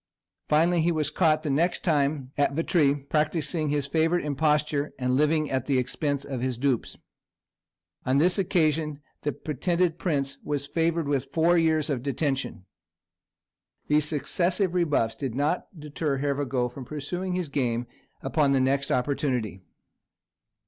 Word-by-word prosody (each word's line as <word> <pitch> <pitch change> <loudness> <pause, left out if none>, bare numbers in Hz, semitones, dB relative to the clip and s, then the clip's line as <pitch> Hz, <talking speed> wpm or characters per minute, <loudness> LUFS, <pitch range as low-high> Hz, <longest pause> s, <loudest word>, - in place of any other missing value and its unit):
Finally, 165 +3 +3
he 170 +2 +2
was 155 -3 -1
caught 155 -2 +2
the 155 - -2
next 170 +6 +1
time 140 -4 0
at 145 -1 +1
Vitry, 155 -2 +2
practising 155 +2 -1
his 145 -1 0
favourite 160 +3 +1
imposture 150 0 0
and 125 -1 0
living 150 +1 +2
at 130 -1 -1
the 140 -2 +2
expense 140 +3 -1
of 135 -3 -4
his 130 -2 -1
dupes. 130 -2 -1 1.1
On 130 +2 +1
this 175 +6 +3
occasion 155 -5 +1 0.2
the 145 - -1
pretended 170 +4 -1
prince 140 -6 -1
was 145 -1 -2
favoured 165 +1 0
with 140 -2 0
four 170 +2 +3
years 160 -2 +2
of 140 -6 -1
detention. 135 - -2 1.2
These 150 0 +3
successive 175 +5 0
rebuffs 150 -10 +1
did 130 -5 -4
not 150 +6 0
deter 150 -1 -2
Hervagault 135 -3 -1
from 130 +2 -9
pursuing 180 +6 -4
his 180 -4 -2
game 125 -4 -1 0.4
upon 140 0 +2
the 135 - +3
next 135 +2 +1
opportunity. 125 -7 -1
150 Hz, 140 wpm, -26 LUFS, 135-160 Hz, 1.2 s, Finally